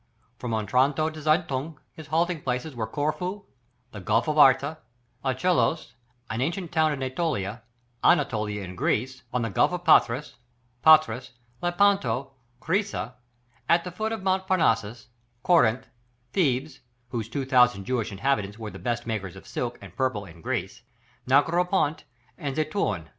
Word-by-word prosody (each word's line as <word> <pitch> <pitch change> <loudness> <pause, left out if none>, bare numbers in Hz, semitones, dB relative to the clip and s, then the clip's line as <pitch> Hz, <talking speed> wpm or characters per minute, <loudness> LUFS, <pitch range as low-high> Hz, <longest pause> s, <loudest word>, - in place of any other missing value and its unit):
From 125 - -4
Otranto 135 +8 +1
to 155 0 -9
Zeitun, 155 -1 0 0.2
his 160 -2 -11
halting 165 +1 0
places 125 +4 -3
were 110 -2 -3
Corfu, 180 - -3 0.5
the 105 - -8
Gulf 95 - +1
of 155 - 0
Arta, 145 +1 +5 0.4
Achelous, 155 +5 +1 0.3
an 110 +2 -3
ancient 170 +4 -2
town 160 -2 +3
in 140 -2 -4
Ætolia, 130 - -2 0.4
Anatolia 105 - +2
in 90 -1 -7
Greece, 130 +8 -1
on 125 -1 -1
the 115 - -2
Gulf 95 - +3
of 180 -1 -4
Patras, 145 -3 +3 0.4
Patras, 135 -6 +5 0.3
Lepanto, 175 - +1 0.3
Crissa, 185 - -1 0.6
at 170 0 +4
the 180 - -6
foot 215 +5 -3
of 220 -4 -4
Mount 190 0 0
Parnassus, 115 - +1 0.3
Corinth, 130 -7 +3 0.5
Thebes, 140 -4 0 0.3
whose 115 -3 -4
two 135 +2 -3
thousand 125 -6 +4
Jewish 115 -3 -1
inhabitants 105 -1 -1
were 110 -2 -6
the - - -10
best 120 -1 -2
makers 105 -6 -4
of - - -12
silk - - -4
and - - -12
purple 125 -6 -1
in 85 -2 -14
Greece, 95 +10 -3 0.5
Negropont 165 +3 +2 0.3
and 140 -5 -3
Zeitoun. 155 - -1
135 Hz, 145 wpm, -26 LUFS, 115-165 Hz, 0.6 s, Arta